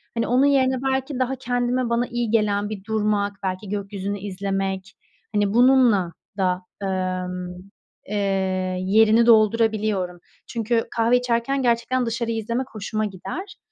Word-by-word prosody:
hani, 230 - 0
onun 255 +3 +4
yerine 265 -2 +3 0.2
belki 265 0 -2
daha 255 +1 0
kendime 245 0 -1
bana 235 +1 +1
iyi 240 -3 -2
gelen 210 -2 +1
bir 205 -3 -6
durmak, 210 -2 0
belki 190 +1 -3
gökyüzünü 200 0 -4
izlemek, 195 -1 -3 0.4
hani, 205 -1 +1
bununla 240 -8 +4 0.2
da, 185 -1 0 0.2
emm, 185 -1 -3 0.5
eee, 210 - -4 0.7
yerini 220 +4 +4
doldurabiliyorum. 215 -5 +3 0.3
Çünkü 230 0 0
kahve 230 +2 +4
içerken 250 +3 0
gerçekten 240 +1 +1
dışarıyı 230 0 -2
izlemek 235 +4 -2
hoşuma 215 +1 -2
gider. 205 - -7
220 Hz, 125 wpm, -23 LUFS, 195-240 Hz, 0.7 s, onun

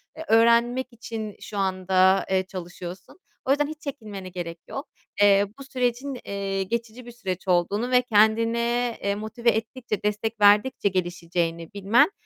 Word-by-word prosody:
E, 315 - -8
öğrenmek 235 +2 +4
için 220 -2 -6
şu 205 - -7
anda, 190 0 +3
eee, 190 0 +3
çalışıyorsun. 180 - -8 0.3
O 265 - +2
yüzden 290 +1 +3
hiç 310 0 -8
çekinmene 210 -9 -7
gerek 170 -2 -6
yok. 275 - -6 0.3
Eee, 200 0 +6
bu - - -7
sürecin, 255 0 -2
eee, 195 -1 -2
geçici 235 +4 -4
bir 240 - -9
süreç 190 -6 -5
olduğunu 195 +7 +1
ve 250 0 +6
kendine, 235 +1 +2
eee, 200 0 +1
motive 220 +3 -1
ettikçe, 220 -1 -2
destek 210 +2 -1
verdikçe 205 +2 +5
gelişeceğini 170 -2 -2
bilmen, 205 - +4
210 Hz, 145 wpm, -25 LUFS, 190-240 Hz, 0.3 s, Eee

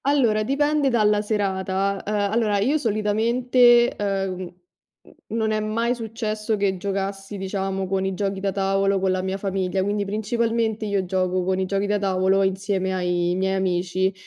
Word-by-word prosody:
Allora, 250 -7 +3
dipende 290 +4 +1
dalla 210 -4 +3
serata. 195 -2 -1
Uhm, 210 - -3 0.2
allora 215 -2 +1
io 265 +10 +1
solitamente, 240 +2 +3
uhm, 195 -2 -1
mhmm, 180 -1 -7 0.8
non 220 0 -1
è 215 - 0
mai 230 +3 0
successo 220 -1 -3
che 195 -2 0
giocassi, 195 +1 -4
diciamo, 195 0 -3
con 190 0 -1
i 190 - -1
giochi 195 +1 -2
da 195 0 -1
tavolo 195 0 +1
con 190 0 0
la 185 0 0
mia 190 +1 -2
famiglia, 190 -1 -1
quindi 205 +1 -1
principalmente 220 +1 -1
io 200 -2 0
gioco 185 0 0
con 185 +1 0
i 190 - 0
giochi 195 +1 -1
da 205 0 +1
tavolo 190 0 +2
insieme 190 0 -1
ai 175 -1 0
miei 190 +1 0
amici. 185 0 0
200 Hz, 165 wpm, -23 LUFS, 190-215 Hz, 0.8 s, Allora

